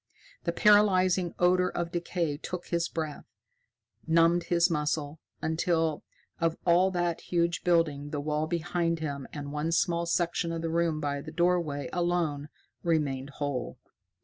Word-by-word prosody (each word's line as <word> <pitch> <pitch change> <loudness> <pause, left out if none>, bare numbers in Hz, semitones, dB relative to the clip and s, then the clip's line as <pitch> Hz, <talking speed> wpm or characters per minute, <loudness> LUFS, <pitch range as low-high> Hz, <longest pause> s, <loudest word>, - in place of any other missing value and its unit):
The - - +1
paralyzing 185 -4 +4
odor 180 +1 +3
of 170 -1 -3
decay 170 -3 -2
took 175 +4 -6
his 170 0 0
breath, 155 -3 -4 0.8
numbed 165 +1 +4
his 170 0 +3
muscles, 150 -2 -2 0.2
until, 160 -1 0 0.4
of 165 -1 0
all 180 +2 +5
that 175 -2 -1
huge 170 -1 0
building, 155 -5 +1
the 145 - -3
wall 150 +1 -1
behind 170 0 -1
him 140 -3 -4
and 145 -1 -6
one 150 +2 -2
small 170 0 +1
section 170 0 0
of 165 0 -4
the 165 - -1
room 165 -2 +1
by 140 -1 -2
the 155 +2 -8
doorway 170 -5 0
alone 170 -5 0 0.3
remained 145 -5 0
whole. 140 -4 -3
165 Hz, 145 wpm, -29 LUFS, 150-175 Hz, 0.8 s, all